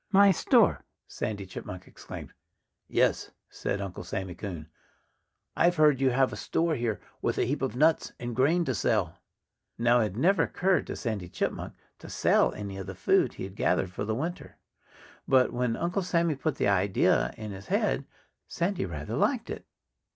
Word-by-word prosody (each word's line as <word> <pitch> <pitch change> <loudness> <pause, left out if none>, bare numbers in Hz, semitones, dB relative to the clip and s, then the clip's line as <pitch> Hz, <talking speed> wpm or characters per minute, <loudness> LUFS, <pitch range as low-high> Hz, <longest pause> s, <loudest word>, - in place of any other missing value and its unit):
"My 200 0 +7
store!" 185 - +3 0.2
Sandy 100 -2 -4
Chipmunk 90 0 -8
exclaimed. - - -10 0.5
"Yes!" - - +1 0.2
said 100 - -3
Uncle 100 -2 -5
Sammy 95 -2 -4
Coon. 85 -6 -7 0.9
"I've 175 +1 +3
heard 150 -4 +4
you 135 - +4
have 130 +1 +2
a - - -3
store 165 0 0
here 115 -7 -1 0.2
with - - -1
a - - +2
heap 140 +4 -2
of 130 -2 -2
nuts 155 +4 +3
and 120 -1 -4
grain 160 +8 +3
to 130 - 0
sell." 110 - 0 0.6
Now, 120 +1 +4
it - - +3
had 105 -1 -3
never 190 +9 +3
occurred 185 0 +1
to - - -4
Sandy 105 -8 -4
Chipmunk - - -3 0.3
to - - -11
sell - - +3
any 100 -2 -6
of 95 -1 -6
the 95 - -6
food 90 - +2
he - - -6
had 95 +1 -7
gathered 90 -2 +1
for 90 - -4
the 110 +1 -1
winter. 165 +8 -5 0.7
But 130 -2 +4
when 120 -1 0
Uncle 175 +3 -1
Sammy 170 -3 +1
put 140 +1 -2
the - - 0
idea 100 -1 +2
in 110 -1 -6
his 95 0 -9
head - - 0 0.4
Sandy 175 - -1
rather 75 -3 -5
liked - - 0
it. - - -7
120 Hz, 180 wpm, -28 LUFS, 100-155 Hz, 0.9 s, My